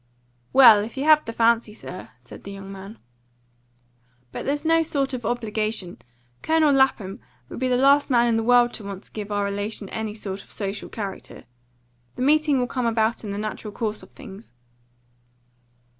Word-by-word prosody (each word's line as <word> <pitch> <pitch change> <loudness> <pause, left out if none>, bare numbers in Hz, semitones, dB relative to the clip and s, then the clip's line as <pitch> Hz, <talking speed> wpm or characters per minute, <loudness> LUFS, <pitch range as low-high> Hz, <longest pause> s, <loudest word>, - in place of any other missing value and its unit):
"Well, 230 -6 +8
if 225 +4 -9
you 270 - -1
have 305 0 +5
the 230 - -4
fancy, 230 -1 +2
sir," 185 -4 -9
said 125 - -13
the 200 - -8
young 195 0 -9
man. 195 +3 -10 1.3
"But - - -6
there's 290 +3 -1
no 330 0 +4
sort 280 -4 -1
of 245 -4 -4
obligation. 215 -5 -3 0.4
Colonel 315 -2 +3
Lapham 260 -8 +1 0.3
would - - -7
be 260 - 0
the 250 -1 +2
last 280 +3 +4
man 240 -2 +4
in 230 - +2
the 225 - +1
world 240 +1 +4
to 220 - -5
want 200 -1 -7
to - - -12
give 210 -1 -6
our 205 0 0
relation 205 0 -3
any 220 -1 -4
sort 200 -2 -6
of - - -24
social 200 -1 -5
character. 200 -3 -7 0.7
The - - -3
meeting 300 0 +3
will 250 - +1
come 250 -1 -2
about 225 0 0
in 210 - -6
the 200 - -4
natural 215 0 -5
course 215 0 -3
of - - -15
things." 205 - -13
225 Hz, 185 wpm, -23 LUFS, 205-260 Hz, 1.3 s, Well